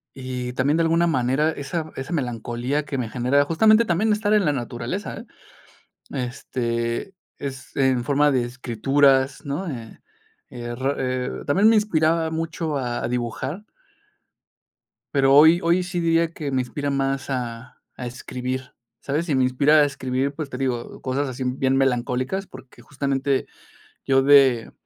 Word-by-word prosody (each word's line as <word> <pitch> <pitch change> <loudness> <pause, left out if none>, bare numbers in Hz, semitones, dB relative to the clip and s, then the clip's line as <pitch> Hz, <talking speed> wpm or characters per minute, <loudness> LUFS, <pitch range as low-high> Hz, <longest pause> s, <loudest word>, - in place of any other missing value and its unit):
Y 130 -2 -5
también, 135 +4 +1
de 165 - +2
alguna 165 +1 +3
manera, 135 +1 +1
esa 155 +2 -4
esa 135 +5 -6
melancolía 125 0 -2
que 145 -1 -4
me 120 -4 -3
genera, 130 +5 +2
justamente 215 +8 +4
también 200 +5 +1
estar 210 0 +1
en 210 -1 +4
la 150 - +2
naturaleza, 125 - -4
¿eh? 230 - -10 0.9
Este, 120 +3 -3 0.2
es 135 -2 -7
en 130 -3 +2
forma 145 +2 +3
de 125 -3 +1
escrituras, 130 +3 +1
¿no?, 145 +7 -3
eh 115 -6 -8 0.5
eh 120 -1 -6
ra 135 +3 -1
eh, 130 -1 -2 0.2
también 195 +9 +4
me 225 - +5
inspiraba 165 -5 +2
mucho 160 -1 -3
a 120 -3 -3
a - - 0
dibujar. 125 - -3 1.5
Pero 135 0 +5
hoy 160 +3 +7
hoy, 175 +2 +2
sí 180 -1 -3
diría 165 0 +2
que 150 -4 -5
me 130 -1 +1
inspira 145 +3 -4
más 135 0 -1
a 120 -2 -5 0.2
a 125 - -5
escribir, 125 +1 -5 0.3
¿sabes?, 155 +5 -2
y 145 - +2
me 130 - +3
inspira 140 +4 +3
a - - +6
escribir, 135 -1 -2
pues 150 -1 -5
te 125 - -6
digo, 125 -3 -3
cosas 135 +2 -1
así, 130 0 -5
bien 130 +1 0
melancólicas, 130 +7 0
porque 130 -1 -14
justamente, 140 -1 -1 0.6
yo 135 0 +4
de 135 -4 +5
135 Hz, 155 wpm, -23 LUFS, 125-155 Hz, 1.5 s, hoy